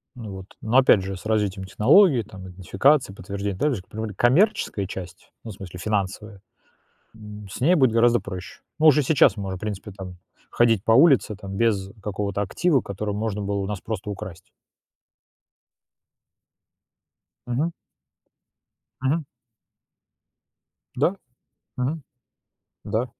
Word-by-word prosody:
Ну 115 -4 -8
вот, 95 -1 -8 0.2
ну 115 +4 +1
опять 130 -6 +6
же, 95 0 -4
с - - -14
развитием 105 -3 0
технологии, 130 - +5
там, 95 -3 -11
идентификации, 95 +7 +1
подтверждения, 100 +1 -5
также 130 -5 0
по 95 - -27
поводу 110 -2 -4
коммерческой 130 - +2
части, 90 -2 -8 0.2
ну, 115 - -8
в - - -8
смысле 90 -2 -9
финансовой, 100 +1 -3 0.7
м, 105 -1 -11
с - - -7
ней 165 +8 +4
будет 130 -8 +4
гораздо 120 +1 +3
проще. 95 -1 -8 0.2
Мы 155 - +5
уже 150 -1 +6
сейчас 140 -2 +4
можем, 95 -2 -4
в - - -17
принципе, 105 -1 -5
там 95 -2 -9 0.3
ходить 115 -4 +2
по 115 - +4
улице, 135 -5 +5
там, 95 -1 -8
без 100 -4 +1
какого-то 100 0 -3
актива, 150 - +1
который 105 -1 -4
можно 105 -1 -3
было 100 0 -2
у 95 -1 -2
нас 105 -2 -4
просто 105 -2 -5
украсть. 95 -4 -8 3.0
Мгм. 140 +8 -1 1.3
Мгм. 145 +5 0 1.7
Да, 165 +8 +2 0.6
мгм. 140 +5 -2 0.8
Да. 115 +3 -1
105 Hz, 135 wpm, -24 LUFS, 95-125 Hz, 3.0 s, опять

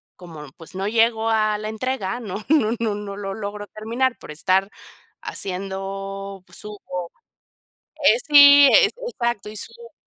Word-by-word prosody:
como, 165 -4 -11
pues, 165 - -13
no 190 +1 -2
llego 225 0 +2
a 215 -1 +1
la 215 0 -5
entrega, 220 -1 -3
no 210 -2 -6
no 285 -8 +3
no 220 -3 -1
no 205 -1 -6
lo 195 -1 -5
logro 205 -1 -6
terminar 235 +5 -2
por - - -11
estar 185 +5 +1 0.5
haciendo 195 +1 -5
pues, - - -10
subo 180 -4 -6 0.9
eh, - - +6
sí, 285 -1 +9
e 475 - +7 0.2
exacto, 235 - -3
y 215 - -10
subo 470 - -9
210 Hz, 150 wpm, -22 LUFS, 195-235 Hz, 0.9 s, sí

